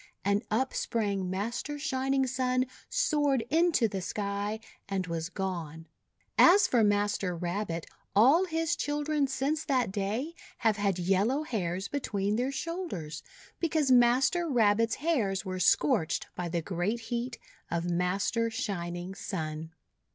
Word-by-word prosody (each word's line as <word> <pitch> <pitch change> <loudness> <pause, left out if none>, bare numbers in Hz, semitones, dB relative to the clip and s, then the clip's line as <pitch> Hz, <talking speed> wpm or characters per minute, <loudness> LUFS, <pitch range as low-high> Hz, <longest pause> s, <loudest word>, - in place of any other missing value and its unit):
And 200 +1 +2
up 260 +5 0
sprang 200 -5 -1
Master 235 +9 -3
Shining 270 -1 0
Sun, 255 0 +1 0.2
soared 295 - +2
into 325 -6 +4
the 195 -2 -4
sky, 205 +2 -3 0.3
and 195 -2 -1
was 165 -1 -3
gone. 170 -5 -4 0.5
As 380 +3 +7
for 235 -3 +3
Master 205 -3 +1
Rabbit, 175 -1 -3 0.3
all 275 - +6
his 325 -1 0
children 295 0 0
since 275 +4 -1
that 255 -8 +1
day 215 +10 -2 0.2
have 220 -3 +2
had 200 -3 +1
yellow 195 - +1
hairs 190 - -2
between 205 -7 -1
their 250 +4 0
shoulders, 275 - -4 0.4
because 310 -5 +1
Master 255 +8 +4
Rabbit's 225 -3 +3
hairs 230 - 0
were 185 -1 -3
scorched 160 -1 +2
by 175 -1 -4
the 170 -1 -2
great 195 +7 -2
heat 240 +1 -2 0.3
of 170 0 -1
Master 195 +6 0
Shining 180 -6 -4
Sun. 160 -4 -5
215 Hz, 130 wpm, -29 LUFS, 185-270 Hz, 0.5 s, As